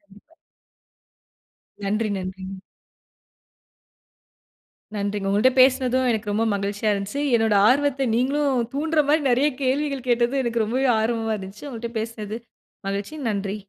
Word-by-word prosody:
கண்டிப்பா. 205 +10 -22 1.5
நன்றி, 215 +2 0
நன்றிங்க. 190 +1 -6 2.4
நன்றிங்க! 205 -1 -2
உங்கள்ட்ட 210 +6 +4
பேசனதும் 255 -1 +3
எனக்கு 215 -2 -2
ரொம்ப 220 +2 +1
மகிழ்ச்சியா 200 +2 -1
இருந்துச்சு. 200 +8 -3
என்னோட 225 -2 +2
ஆர்வத்த 275 0 +2
நீங்களும் 260 -1 +1
தூண்டுற 310 +1 +1
மாரி 310 +1 +4
நெறைய 260 +5 +3
கேள்விகள் 270 0 -1
கேட்டது 240 +2 +2
எனக்கு 235 -2 0
ரொம்ப 235 +5 -1 0.2
ஆர்வமா 225 0 0
இருந்துச்சு. 195 +8 -9
உங்கள்ட்ட 235 -2 -6
பேசனது 220 -1 -5 0.5
மகிழ்ச்சி. 200 +9 -3
நன்றி! 200 -1 -2
230 Hz, 115 wpm, -23 LUFS, 205-260 Hz, 2.4 s, உங்கள்ட்ட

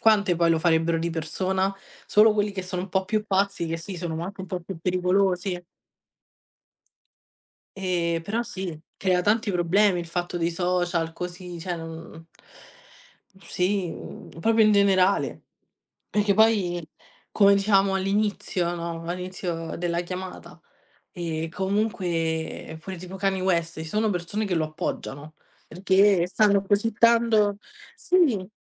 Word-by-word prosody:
quante 205 -5 +4
poi 170 -1 +3
lo 165 - +3
farebbero 165 0 +2
di 170 +1 -2
persona? 190 +4 -1 0.3
Solo 215 +1 +6
quelli 205 -1 0
che 190 -2 -4
sono 180 0 -4
un 190 - -7
po' 190 0 +1
più 215 0 0
pazzi 195 -2 0
che 165 0 -2
sì, 180 +3 -7
sono 165 -1 -4
anche 195 0 -7
un 190 - -7
po' 180 -1 -3
più 170 +1 -8
pericolosi. 180 0 +1 2.1
Ehm, 175 -3 0
però 220 +7 -2
sì, 190 -8 -6 0.2
crea 185 -2 +2
tanti 215 +1 +2
problemi. 180 +2 +3
Il 170 - -7
fatto 175 +1 -3
dei 170 0 0
social 175 -1 0
così, 180 0 -7
cioè 175 +1 -4
non 165 0 -9 1.1
sì, 185 -1 -1 0.5
proprio 225 +4 +4
in 215 0 +5
generale. 200 -1 +2 0.7
Perché 205 -1 +2
poi, 200 -6 +3 0.5
come 200 -1 +5
dicevamo 195 -1 +3
all'inizio 195 -3 0
no, 170 -1 -5
all'inizio 180 -2 -4
della 170 0 -1
chiamata, 185 +1 -8 0.5
ehm, 165 -2 -4
comunque 170 -5 -2
fuori 190 +1 -7
tipo 185 +2 -8
Kanye 195 -1 0
West, 170 -3 0
ci 160 - -6
sono 215 +5 0
persone 205 +4 -2
che 185 - -1
lo 160 - +1
appoggiano, 155 -2 -5 0.3
perché 190 +1 +3
stanno 200 +1 +3
così 210 +3 +1
tanto 230 -3 +4 0.4
sì, 270 - +2
185 Hz, 135 wpm, -25 LUFS, 170-200 Hz, 2.1 s, Solo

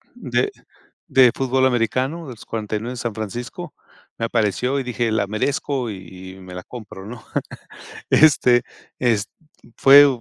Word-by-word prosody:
de 410 - -1 0.6
de 130 -2 +6
fútbol 130 0 +1
americano 130 +6 0
de - - -8
los 115 - -13
49 110 +2 -4
de - - -9
San 120 -2 -3
Francisco 110 +3 -6 0.4
me 115 - -1
apareció 115 +4 0
y 130 - -4
dije 120 -2 -1
la 105 -2 +1
merezco 125 +3 -1
y 95 -1 -9
y - - -14
me 90 -1 -10
la 90 - -6
compro, 105 -5 -10
¿no? 115 0 -9 0.9
Este, 125 -5 +5 0.4
es 115 -5 +2 0.5
fue 140 +1 +9
120 Hz, 145 wpm, -21 LUFS, 105-130 Hz, 0.9 s, fue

